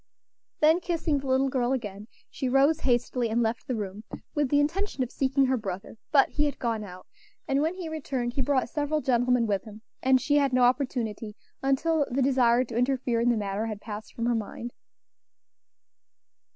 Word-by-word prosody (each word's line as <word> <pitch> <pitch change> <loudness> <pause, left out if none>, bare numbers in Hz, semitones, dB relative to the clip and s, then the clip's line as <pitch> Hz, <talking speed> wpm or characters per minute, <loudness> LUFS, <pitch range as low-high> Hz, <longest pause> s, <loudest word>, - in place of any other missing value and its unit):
Then, 315 +3 +5
kissing 330 -4 -1
the 270 - -7
little 265 +1 +3
girl 255 -1 0
again, 210 -4 -5 0.2
she 260 - -2
rose 280 +5 +4
hastily 245 -2 0
and 235 +2 +1
left 225 +1 -2
the 255 - -1
room, 205 -1 -5 0.3
with 295 -3 0
the 285 - +3
intention 310 0 0
of 250 - -6
seeking 270 0 +2
her 260 0 +1
brother; 195 -3 -6 0.2
but 280 -2 +5
he 295 - 0
had 290 - -2
gone 230 -3 -2
out; 185 -2 -10 0.4
and 275 +1 +1
when 320 +4 0
he 365 -3 -6
returned 270 -6 -3
he 270 - -1
brought 260 -1 +1
several 300 +3 -1
gentlemen 245 -2 +2
with 200 -3 -1
him, 215 0 -12 0.2
and 260 0 +4
she 290 +3 +2
had 280 -2 +2
no 255 0 +4
opportunity 245 -5 0 0.3
until 285 +3 +1
the 265 +1 +1
desire 250 -2 +4
to 235 -2 -8
interfere 245 -1 +1
in 240 - +3
the 240 - +2
matter 205 +1 -2
had 215 -2 -5
passed 210 0 -8
from 230 - -2
her 240 - +2
mind. 230 +2 -4
255 Hz, 190 wpm, -27 LUFS, 230-280 Hz, 0.4 s, Then